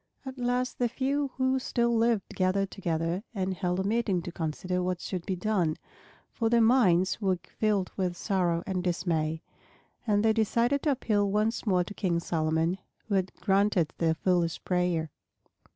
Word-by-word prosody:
At 265 0 -7
last 250 +1 -1
the 245 -1 +2
few 275 +3 0
who 260 0 +2
still 235 -2 0
lived 225 -3 +1
gathered 190 +1 0
together 170 -1 -2
and 190 -1 -1
held 180 -1 -1
a - - 0
meeting 200 -4 0
to 175 - -6
consider 180 +3 -2
what 180 -1 -1
should 180 -2 -5
be 190 - 0
done, 180 -5 0 0.6
for 225 -1 0
their 235 0 +4
minds 205 -5 +4
were 190 -2 +1
filled 205 -4 -1
with 180 -2 -1
sorrow 175 -4 0
and 185 -2 -2
dismay. 165 -3 -1 0.6
And 205 0 +2
they 220 - +5
decided 235 +5 +1
to 300 - +2
appeal 210 -6 +1
once 215 +3 0
more 180 -3 +3
to 190 - -9
King 175 -5 0
Solomon, 165 +2 0 0.3
who 210 - -2
had 190 -1 +1
granted 195 -4 +2
their 160 -1 +2
foolish 175 -1 0
prayer. 180 -4 0
190 Hz, 170 wpm, -28 LUFS, 175-225 Hz, 0.6 s, they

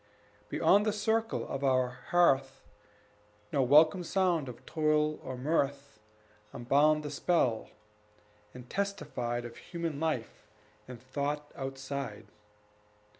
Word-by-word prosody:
Beyond 195 +6 +4
the 210 - +2
circle 220 +2 0
of 135 0 -4
our 130 -2 +3 0.2
hearth 135 -6 +2 0.9
No 140 - +3
welcome 155 +7 +5
sound 175 -5 +1
of 120 - -11
toil 155 -1 +1
or 130 -1 -6
mirth 140 -2 -1 0.5
Unbound 145 +5 +3
the 150 - -5
spell, 140 -7 +1 0.8
and 125 +1 -11
testified 140 -12 -3
Of 120 - -9
human 170 -4 -5
life 130 -9 -3 0.4
and 125 -2 -9
thought 145 +3 -3
outside. 135 -4 -5
140 Hz, 110 wpm, -31 LUFS, 130-165 Hz, 0.9 s, welcome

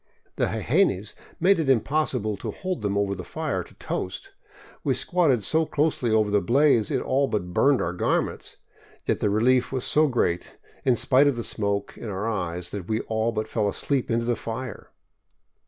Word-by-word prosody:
The - - +1
jejenes 110 - +1 0.3
made 185 +1 +4
it 155 -4 0
impossible 130 -4 +1
to - - -5
hold 185 -1 -4
them 100 -1 -1
over 100 -1 +1
the 90 -2 -6
fire 160 - -3
to - - -18
toast. 390 - -5 0.5
We - - +1
squatted 160 - +2
so 160 +9 +1
closely 150 -5 0
over 110 -2 +2
the 105 0 +3
blaze 120 +1 +3
it - - 0
all 140 +1 +1
but 90 -7 -3
burned 140 +5 +3
our 85 - -2
garments, 90 - -1 0.5
yet - - 0
the 105 - +1
relief 125 +4 +2
was 130 -2 -2
so 155 +1 +4
great, 115 -10 -1 0.3
in 130 -2 +3
spite 135 +4 +4
of 140 - +2
the 120 - -4
smoke 100 -2 -2
in 115 - -6
our 100 +2 -3
eyes, 90 -5 -3
that 100 -4 -6
we 110 0 0
all 110 +1 -1
but 110 -1 -3
fell 105 -2 0
asleep 135 +5 -1
into 115 0 0
the 120 0 +1
fire. 115 +1 -6
115 Hz, 190 wpm, -25 LUFS, 105-140 Hz, 0.5 s, made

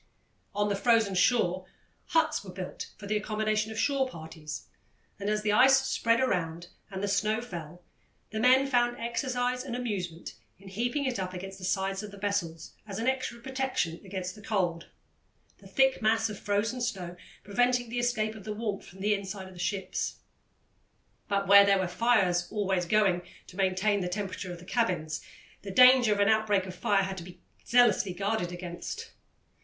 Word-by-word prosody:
On 205 0 +1
the 205 - 0
frozen 225 -1 +3
shore 185 -2 +2 0.4
huts 315 -6 +1
were 195 - -10
built 185 0 -6
for 205 - -10
the 210 +1 -1
accommodation 215 +1 -1
of 220 - -7
shore 270 +2 +1
parties, 160 -4 -8 0.5
and, 200 +1 -2
as 210 0 0
the 210 - +2
ice 265 +5 +7
spread 230 -2 +2
around 175 -8 -1 0.2
and 190 -1 -5
the - - +1
snow 210 +2 +1
fell, 175 -6 -8 0.5
the 220 - -3
men 255 +3 +5
found 240 -2 +2
exercise 250 +1 -1
and 255 -3 -5
amusement 190 -9 -4 0.2
in 195 0 -13
heaping 245 +8 -1
it 255 -6 -1
up 185 -1 -4
against 195 +2 -7
the - - -11
sides 195 +1 -1
of 210 - -7
the 200 - -12
vessels 195 -6 -3
as 195 -2 -5
an 230 +2 -2
extra 260 -2 -1
protection 260 -10 -2
against 185 -2 -5
the 210 - -13
cold, 180 -5 -1 0.7
the - - -14
thick 265 -2 +2
mass 220 0 +2
of 205 - -8
frozen 215 +5 -1
snow 190 -8 -3 0.3
preventing 245 +3 +1
the 240 +1 -2
escape 220 -3 0
of 215 -3 -11
the 215 - -4
warmth 210 -2 -4
from 190 +1 -13
the 210 +1 +2
inside 195 -1 -5
of 185 - -12
the 175 - -13
ships. 190 +2 -2 1.1
But 200 -1 0
where 200 +1 +9
there 200 0 +4
were 190 -1 0
fires 180 -3 +2
always 190 -4 0
going 195 -3 +3 0.2
to 180 - -14
maintain 195 +2 +1
the 180 - -2
temperature 190 -1 -4
of 175 - -6
the 175 - -13
cabins, 175 -9 -1 0.4
the 200 - -8
danger 250 +2 +7
of 205 - +1
an 200 - +4
outbreak 210 -3 +3
of 185 - -7
fire 195 +2 +1
had 190 0 -4
to 175 - -6
be 180 +1 -12 0.2
zealously 220 -6 +3
guarded 195 -2 -1
against. 175 -1 -6
205 Hz, 185 wpm, -29 LUFS, 185-235 Hz, 1.1 s, where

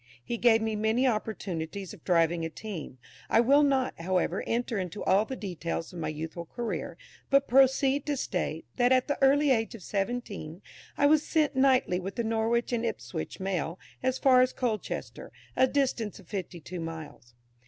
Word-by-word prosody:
He 235 - -2
gave 225 -1 +4
me 220 -1 -1
many 220 +4 +1
opportunities 200 -6 -3
of - - -14
driving 170 -1 +2
a 165 - -2
team. 165 -7 -7 0.3
I - - +4
will 275 +5 +5
not, 270 - +1
however, 180 +1 0
enter 235 -2 -1
into 185 +2 -4
all 195 +3 +3
the 265 - -5
details 175 -5 -4
of 175 - -7
my 155 - -2
youthful 160 +2 -5
career, 240 +3 -4 0.3
but 275 0 +4
proceed 270 +2 +4
to 290 -1 0
state, 170 -8 -2
that 245 0 +3
at 255 -1 +4
the 285 - -1
early 280 +1 +5
age 225 -1 +1
of 205 - -11
seventeen 200 -5 -4 0.3
I 285 - +3
was 300 +1 +5
sent 300 -3 +1
nightly 260 -9 +3
with 190 +1 -6
the 235 - -1
Norwich 225 +2 0
and 235 -1 0
Ipswich 115 - -4
Mail 185 -3 -2 0.2
as 260 0 0
far 255 -2 +5
as 255 0 +2
Colchester, 225 -5 -4 0.2
a 260 - +5
distance 250 -6 -1
of 195 - -15
fifty 185 -2 -5
two 175 +3 -7
miles. 160 -7 -8
220 Hz, 180 wpm, -29 LUFS, 180-255 Hz, 0.3 s, will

